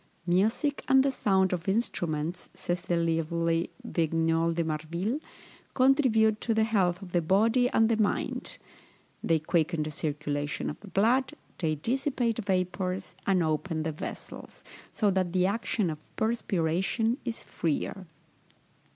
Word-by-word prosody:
Music 220 - +1
and 265 0 +6
the 275 - +2
sounds 190 -6 +2
of 175 0 -3
instruments, 175 -6 -1
says 175 0 -2
the 175 -1 +1
lively 165 0 0 0.2
Vigneul 165 0 +1
de 165 0 0
Marville, 170 - -2 0.6
contribute 250 -5 +4
to 225 - 0
the 220 - +3
health 195 -4 +1
of 180 - -10
the 175 - +2
body 225 +9 +3
and 225 -2 +3
the 225 -1 +1
mind; 205 - -1 0.7
they 165 - +3
quicken 160 0 0
the 155 - -4
circulation 145 -1 -2
of - - -10
the 210 - -13
blood, 235 +7 +2 0.2
they 155 -3 0
dissipate 240 - -1
vapours, 185 -1 -1
and 185 -3 +3
open 160 +1 -1
the 160 - -1
vessels, 150 - -8 0.3
so 210 -3 +2
that 185 -2 0
the 185 -1 +3
action 205 -2 0
of 155 - -7 0.2
perspiration 220 - 0
is 235 -2 -5
freer. 170 +4 -3
185 Hz, 140 wpm, -28 LUFS, 165-220 Hz, 0.7 s, and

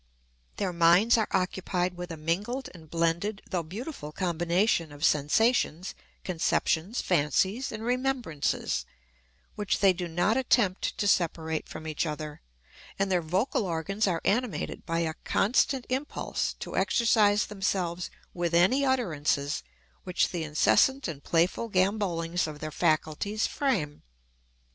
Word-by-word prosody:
Their 190 -3 -1
minds 170 +7 +5
are 220 - +1
occupied 185 -1 -1
with 180 0 -6
a 165 - -6
mingled 200 - -2
and 160 -3 -14
blended 170 +5 -1
though 180 - 0
beautiful 185 - -7
combination 175 0 +1
of 145 +2 -2
sensations, 175 - +2 0.3
conceptions, 180 +3 0
fancies, 185 - +1
and 215 - -6
remembrances, 245 - -1 0.7
which 205 -2 -1
they 195 -2 +5
do 175 0 -4
not 175 +8 +1
attempt 235 -7 +1
to 205 - 0
separate 160 -4 0
from 160 - -8
each 155 +1 -1
other, 150 -1 -6 0.6
and 195 0 0
their 180 -2 +2
vocal 185 - 0
organs 195 +4 -1
are 170 -3 0
animated 240 +1 -1
by 165 0 0
a 160 -1 -1
constant 250 +4 +2
impulse 265 +4 -2
to - - -7
exercise 210 -3 +3
themselves 185 -3 -2 0.2
with 175 -1 -1
any 195 +11 +4
utterances 155 - 0 0.4
which 180 - +1
the 175 -3 -3
incessant 235 - +3
and 150 -5 -6
playful 175 +7 +1
gambollings 185 -4 0
of 150 -1 -7
their 155 0 -5
faculties 160 +7 0
frame. 195 - -1
180 Hz, 130 wpm, -28 LUFS, 165-210 Hz, 0.7 s, minds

